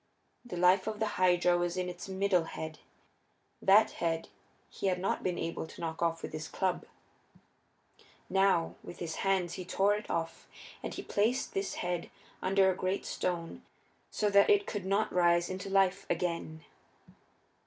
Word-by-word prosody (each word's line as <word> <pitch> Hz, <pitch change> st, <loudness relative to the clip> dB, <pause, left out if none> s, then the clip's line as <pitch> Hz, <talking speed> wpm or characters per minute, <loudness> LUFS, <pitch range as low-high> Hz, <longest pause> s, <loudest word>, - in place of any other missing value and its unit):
The 210 Hz, -8 st, -7 dB
life 180 Hz, +3 st, +4 dB
of 215 Hz, -1 st, -3 dB
the 220 Hz, -, +1 dB, 0.2 s
Hydra 175 Hz, -1 st, +4 dB
was 175 Hz, +1 st, -1 dB
in 180 Hz, 0 st, -1 dB
its 180 Hz, +2 st, -7 dB
middle 190 Hz, -3 st, +2 dB
head; 160 Hz, -1 st, -6 dB, 0.8 s
that 205 Hz, +3 st, +6 dB
head 165 Hz, -1 st, -2 dB, 0.4 s
he -, -, -4 dB
had 185 Hz, -1 st, +2 dB
not 190 Hz, -, -1 dB
been 180 Hz, -2 st, -1 dB
able 165 Hz, -1 st, -3 dB
to -, -, -13 dB
knock 165 Hz, -1 st, -4 dB
off 165 Hz, -1 st, 0 dB
with -, -, -6 dB
his 155 Hz, 0 st, -5 dB
club. 185 Hz, -2 st, -1 dB, 1.4 s
Now, 190 Hz, -3 st, +2 dB
with -, -, -10 dB
his 165 Hz, -2 st, -5 dB
hands 190 Hz, -3 st, +1 dB
he 185 Hz, -, -5 dB
tore 195 Hz, +3 st, +2 dB
it 210 Hz, +1 st, -4 dB
off, 165 Hz, 0 st, -3 dB, 0.3 s
and -, -, -4 dB
he -, -, -6 dB
placed 230 Hz, +6 st, 0 dB
this 195 Hz, 0 st, -2 dB
head 175 Hz, -1 st, -2 dB, 0.3 s
under 190 Hz, 0 st, +4 dB
a -, -, -3 dB
great 185 Hz, +1 st, -2 dB
stone 170 Hz, -2 st, -3 dB, 0.5 s
so 210 Hz, -1 st, 0 dB
that 200 Hz, 0 st, +6 dB
it 410 Hz, -1 st, +5 dB
could 200 Hz, -3 st, -4 dB
not 200 Hz, +3 st, +1 dB
rise 175 Hz, 0 st, +3 dB
into 190 Hz, +1 st, -5 dB
life 195 Hz, 0 st, +2 dB
again. 165 Hz, -3 st, -2 dB
185 Hz, 165 wpm, -31 LUFS, 170-195 Hz, 1.4 s, that